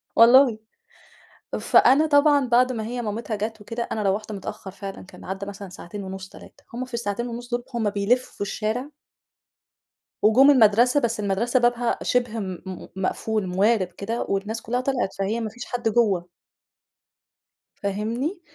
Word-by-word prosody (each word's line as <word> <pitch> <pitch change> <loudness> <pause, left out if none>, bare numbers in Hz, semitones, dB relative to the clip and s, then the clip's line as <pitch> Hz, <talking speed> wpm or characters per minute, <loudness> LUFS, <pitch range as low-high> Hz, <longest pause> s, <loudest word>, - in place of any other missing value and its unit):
والله. 240 0 +7 1.0
فأنا 275 +6 +5
طبعًا 285 -1 +4
بعد 250 +1 +4
ما 220 - -3
هي 245 +2 -4
مامِتها 220 +1 -3
جات 215 +1 -4
وكده، 230 +3 -4
أنا 215 - -1
روّحت 205 +2 -1
متأخّر 195 -1 -7
فعلًا، 195 0 -8
كان - - -14
عدّى 195 +1 -5
مثلًا 200 -1 -8
ساعتين 190 +3 -8
ونُص، 190 0 -7
3. - - -15
هم 250 +2 -3
في 255 - -18
الساعتين 235 0 -2
ونُص 240 0 -7
دول، 240 0 -2
هم 225 -3 0
بيلفّوا 205 +6 -1
الشارع 220 +7 -3 1.3
وجُم 255 +7 +6
المَدرسة، 240 +2 +5
بس 235 -4 -1
المَدرسة 210 +5 +1
بابها 240 -1 +1
شِبه 240 -2 0
م 185 -3 -4
م 185 -2 -7
مقفول، 195 +2 -1
موارِب 195 +2 +2
كده 200 +6 -4
والناس 210 +3 -2
كُلّها 245 +3 -1
طلِعت، 255 -6 -1
فهي 205 +4 0
ما 220 - -3
فيش 245 +3 -9
حد 240 -2 -1
جوّه. 205 -6 +2 1.5
فاهمني؟ 230 - -2
225 Hz, 150 wpm, -24 LUFS, 200-245 Hz, 1.5 s, والله